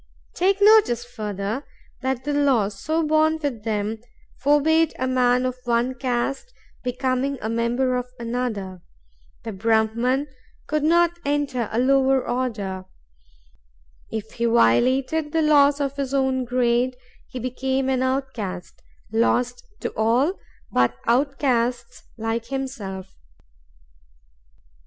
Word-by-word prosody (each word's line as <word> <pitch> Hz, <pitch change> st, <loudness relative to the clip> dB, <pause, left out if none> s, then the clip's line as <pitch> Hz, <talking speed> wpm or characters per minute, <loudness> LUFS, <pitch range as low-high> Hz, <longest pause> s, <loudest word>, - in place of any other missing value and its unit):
Take 390 Hz, +2 st, +2 dB
notice, 405 Hz, -, +5 dB
further, 215 Hz, +1 st, -4 dB, 0.4 s
that 260 Hz, -1 st, -2 dB
the 290 Hz, +2 st, -2 dB
law, 270 Hz, -8 st, +3 dB
so 315 Hz, +11 st, -2 dB
born 310 Hz, +1 st, +3 dB
with 280 Hz, -8 st, -4 dB
them, 215 Hz, 0 st, -2 dB, 0.4 s
forbade 300 Hz, +4 st, +3 dB
a 260 Hz, -, -1 dB
man 250 Hz, 0 st, +2 dB
of 255 Hz, 0 st, -2 dB
one 240 Hz, +2 st, +1 dB
caste 255 Hz, -, -2 dB, 0.3 s
becoming 255 Hz, +2 st, -1 dB
a 220 Hz, -, -3 dB
member 240 Hz, +3 st, +1 dB
of 250 Hz, 0 st, -2 dB
another; 230 Hz, -6 st, -3 dB, 0.6 s
the 225 Hz, -, -5 dB
Brahman 225 Hz, +6 st, +1 dB, 0.4 s
could 305 Hz, 0 st, -1 dB
not 345 Hz, +2 st, +3 dB
enter 285 Hz, -5 st, -1 dB
a 220 Hz, -, -2 dB
lower 265 Hz, +1 st, +3 dB
order; 210 Hz, -7 st, -3 dB, 1.2 s
if 220 Hz, 0 st, -5 dB
he 235 Hz, -, -2 dB
violated 260 Hz, -, +2 dB
the 325 Hz, -1 st, +2 dB
laws 290 Hz, -1 st, +5 dB
of 280 Hz, -1 st, -2 dB
his 275 Hz, -1 st, -2 dB
own 265 Hz, -1 st, +1 dB
grade, 250 Hz, 0 st, +1 dB, 0.3 s
he -, -, -8 dB
became 260 Hz, +2 st, -1 dB
an 260 Hz, -1 st, +1 dB
outcast, 260 Hz, -9 st, -3 dB, 0.3 s
lost 245 Hz, -, +1 dB, 0.2 s
to -, -, -3 dB
all 240 Hz, -, +2 dB, 0.4 s
but 125 Hz, 0 st, +2 dB
outcasts 245 Hz, -2 st, 0 dB, 0.2 s
like 225 Hz, +1 st, -2 dB
himself." 215 Hz, -9 st, -5 dB
255 Hz, 120 wpm, -23 LUFS, 230-275 Hz, 1.2 s, notice